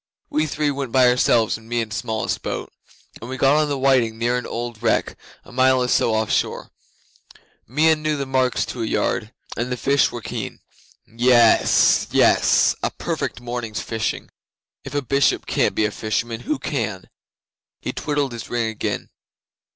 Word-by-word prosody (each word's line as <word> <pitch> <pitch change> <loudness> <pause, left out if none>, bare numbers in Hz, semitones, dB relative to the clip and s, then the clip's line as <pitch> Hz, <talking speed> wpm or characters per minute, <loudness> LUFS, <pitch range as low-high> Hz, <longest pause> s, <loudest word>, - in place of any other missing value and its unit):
We 155 +1 +1
three 150 0 0
went 135 -3 -4
by 130 0 +5
ourselves 120 -3 +2
in 115 0 -17
Meon's 115 -3 -2
smallest 110 -3 -2
boat, - - -5 0.5
and 115 - -8
we 130 - -4
got 140 +3 +4
on 150 - 0
the 140 - -1
whiting 130 -4 +2
near 120 +2 0
an 125 - -3
old 120 -1 -5
wreck, 115 -1 +1 0.3
a - - -14
mile 130 0 +3
or - - -1
so 115 -2 +2
off 110 -1 0
shore. - - -1 1.0
Meon 155 +5 +2
knew 155 -1 0
the 140 - -3
marks 130 -1 +1
to 120 - -6
a - - 0
yard, 110 0 -1 0.2
and 120 +2 -3
the 125 - -2
fish 140 +3 +2
were 120 - -5
keen. - - -5 0.5
Yes 120 0 +4
yess! - - +4
A - - 0
perfect - - -4
morning's 120 -3 -4
fishing! 110 -1 -3 0.5
If 135 +1 -8
a 145 - 0
Bishop 140 +2 +1
can't - - 0
be 110 - +2
a 105 - -1
fisherman, 115 +2 -2
who 150 +4 -2
can?' 115 -9 -3 0.7
He - - -4
twiddled 145 -3 -1
his 115 -1 -7
ring 120 -2 -1
again. 110 - -4
125 Hz, 175 wpm, -22 LUFS, 115-135 Hz, 1.0 s, by